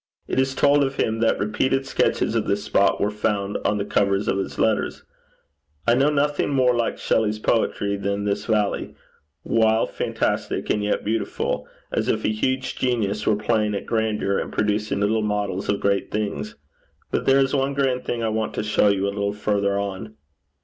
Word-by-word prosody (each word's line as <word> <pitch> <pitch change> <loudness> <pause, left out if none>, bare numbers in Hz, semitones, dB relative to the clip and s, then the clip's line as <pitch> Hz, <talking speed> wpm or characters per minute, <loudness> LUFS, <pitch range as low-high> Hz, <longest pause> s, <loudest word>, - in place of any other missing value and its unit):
It - - 0
is 130 0 +1
told 145 +1 +4
of 135 0 -2
him 110 -3 0
that 115 - +2
repeated 130 +6 0
sketches 135 - +1
of - - 0
the - - +2
spot - - +2
were 105 - +1
found 105 -1 -1
on 105 - +1
the 100 - -2
covers 100 -1 +1
of 95 - +1
his 95 - -4
letters. - - 0 0.8
I 115 - +4
know 135 +4 +4
nothing 145 0 +1
more 130 -3 +3
like 120 -1 -1
Shelley's 110 -1 +1
poetry 100 -2 0
than 100 0 -2
this 100 0 -2
valley 105 -3 0 0.5
wildly 110 0 +2
fantastic - - -1
and 105 - 0
yet 105 - -1
beautiful 110 +2 -2 0.2
as - - -1
if - - 0
a - - +3
huge 130 +4 -1
genius 110 -5 0
were 110 - +4
playing 105 0 0
at 100 - -4
grandeur, 110 -3 0
and - - -4
producing 105 -1 0
little 110 +2 +2
models 105 -2 -2
of 100 - +1
great 100 -1 0
things. 105 0 -3 0.6
But - - -1
there 135 0 +6
is 135 0 +2
one 135 0 0
grand 130 -2 0
thing 115 -1 -3
I 110 - +1
want 110 0 -2
to - - -1
show 105 0 +3
you 100 -1 +2
a 100 - -1
little 100 0 -1
further 100 -1 0
on.' 100 +2 -4
105 Hz, 190 wpm, -23 LUFS, 100-120 Hz, 0.8 s, there